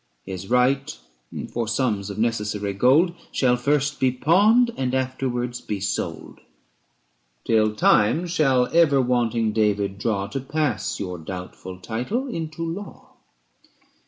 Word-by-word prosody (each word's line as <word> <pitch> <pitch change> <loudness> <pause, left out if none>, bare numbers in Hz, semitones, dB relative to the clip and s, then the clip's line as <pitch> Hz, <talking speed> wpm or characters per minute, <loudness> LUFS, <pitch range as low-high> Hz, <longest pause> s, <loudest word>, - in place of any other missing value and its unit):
99 95 - -7
His 95 +2 -7
right 130 +3 +2 0.6
for 115 -1 -2
sums 110 -4 -1
of 100 - -6
necessary 105 -3 -1
gold 130 - +4
405 170 - -22
Shall 125 -2 +3
first 145 +3 0
be 130 -1 +3
pawned, 205 - +4
and 130 -1 -1
afterwards 125 -2 -2
be 105 -2 -4
sold; 95 - -4 1.1
Till 110 -1 +2
time 105 +10 +3
shall 140 -8 +2
ever 155 -5 +5
wanting 120 -3 +1
David 100 -2 0
draw 100 -3 -1
To 135 - -4
pass 135 - -2
your 90 -3 -5
doubtful 90 +2 -8
title 125 - -3
into 165 -7 -5
law. 175 +5 -7
125 Hz, 130 wpm, -23 LUFS, 105-145 Hz, 1.1 s, ever